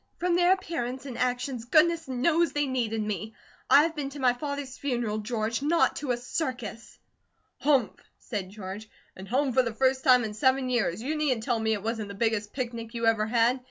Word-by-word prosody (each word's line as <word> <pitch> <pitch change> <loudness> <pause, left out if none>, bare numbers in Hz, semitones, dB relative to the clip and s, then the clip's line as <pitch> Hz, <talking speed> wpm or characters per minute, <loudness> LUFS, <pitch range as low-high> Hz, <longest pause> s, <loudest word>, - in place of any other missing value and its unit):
"From 355 0 +1
their 350 +1 +4
appearance 265 -9 -4
and 260 -3 -6
actions, 250 0 -2
goodness 325 +4 +3
knows 315 +7 +1
they 290 0 +1
needed 230 -5 -1
me. 215 +1 -4 0.3
I 290 - +8
have 325 0 -1
been 285 -2 -3
to 285 +1 -9
my 255 -2 +4
father's 285 0 -5
funeral, 240 -6 -2
George; 220 +1 -2
not 330 +4 +2
to 290 - -5
a 245 - +1
circus." 245 -3 -5 0.6
"Humph!" 265 -4 +1 0.2
said 200 -5 -5
George. 205 +1 -8 0.3
"And 190 +1 -10
home 265 +3 +1
for 260 - +5
the 230 -3 -4
first 260 +1 +2
time 250 -1 +6
in 215 -1 -4
seven 260 +4 +2
years. 225 -5 0
You 300 +4 -1
needn't 275 -7 0
tell 235 0 0
me 220 0 +1
it 205 -2 -4
wasn't 225 -1 -2
the 200 - -8
biggest 215 -1 0
picnic 235 -3 -5
you 230 0 -1
ever 220 -1 +3
had! 235 +3 +2
245 Hz, 200 wpm, -27 LUFS, 225-275 Hz, 0.6 s, I